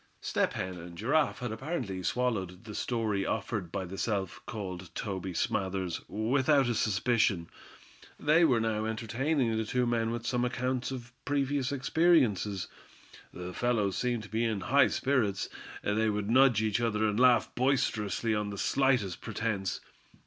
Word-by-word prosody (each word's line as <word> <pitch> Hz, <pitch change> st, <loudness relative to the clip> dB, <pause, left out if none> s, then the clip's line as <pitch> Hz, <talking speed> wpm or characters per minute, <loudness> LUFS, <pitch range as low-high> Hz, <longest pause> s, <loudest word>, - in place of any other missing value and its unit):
Step -, -, 0 dB
Hen 95 Hz, -1 st, -4 dB
and 85 Hz, 0 st, -10 dB
Giraffe 145 Hz, -, +1 dB
had 125 Hz, -2 st, -3 dB
apparently 120 Hz, -, -3 dB
swallowed 100 Hz, -4 st, -1 dB
the 110 Hz, -2 st, -8 dB
story 110 Hz, -4 st, -1 dB
offered 105 Hz, -4 st, -2 dB
by 95 Hz, -, -3 dB
the 95 Hz, +2 st, -7 dB
self 95 Hz, -5 st, -2 dB
called 95 Hz, -6 st, -6 dB
Toby 95 Hz, -3 st, -3 dB
Smathers 95 Hz, 0 st, -1 dB
without 130 Hz, +5 st, +2 dB
a 120 Hz, -, +1 dB
suspicion. 105 Hz, -4 st, +1 dB, 0.7 s
They 155 Hz, +3 st, +4 dB
were 130 Hz, -8 st, +4 dB
now 110 Hz, -1 st, 0 dB
entertaining 115 Hz, +3 st, 0 dB
the 110 Hz, -, 0 dB
two 125 Hz, +3 st, 0 dB
men 115 Hz, -1 st, +1 dB
with 115 Hz, 0 st, -4 dB
some 125 Hz, 0 st, 0 dB
accounts 125 Hz, 0 st, -1 dB
of 120 Hz, -2 st, -7 dB
previous 140 Hz, 0 st, 0 dB
experiences. 130 Hz, -, +2 dB, 0.6 s
The 90 Hz, 0 st, -7 dB
fellows 110 Hz, -4 st, +1 dB
seemed 120 Hz, -3 st, -1 dB
to 105 Hz, -, -11 dB
be 110 Hz, +1 st, 0 dB
in 110 Hz, -4 st, 0 dB
high 135 Hz, +4 st, +4 dB
spirits. 120 Hz, -8 st, 0 dB, 0.3 s
They 110 Hz, +2 st, +1 dB
would 105 Hz, 0 st, -1 dB
nudge 125 Hz, -4 st, +5 dB
each 110 Hz, +2 st, +1 dB
other, 110 Hz, -2 st, +1 dB
and 105 Hz, +1 st, 0 dB
laugh 125 Hz, -1 st, +4 dB
boisterously 115 Hz, -5 st, +1 dB
on 105 Hz, -1 st, -1 dB
the 100 Hz, -, -6 dB
slightest 125 Hz, -8 st, +1 dB
pretense. 105 Hz, -4 st, -2 dB
110 Hz, 155 wpm, -30 LUFS, 100-125 Hz, 0.7 s, nudge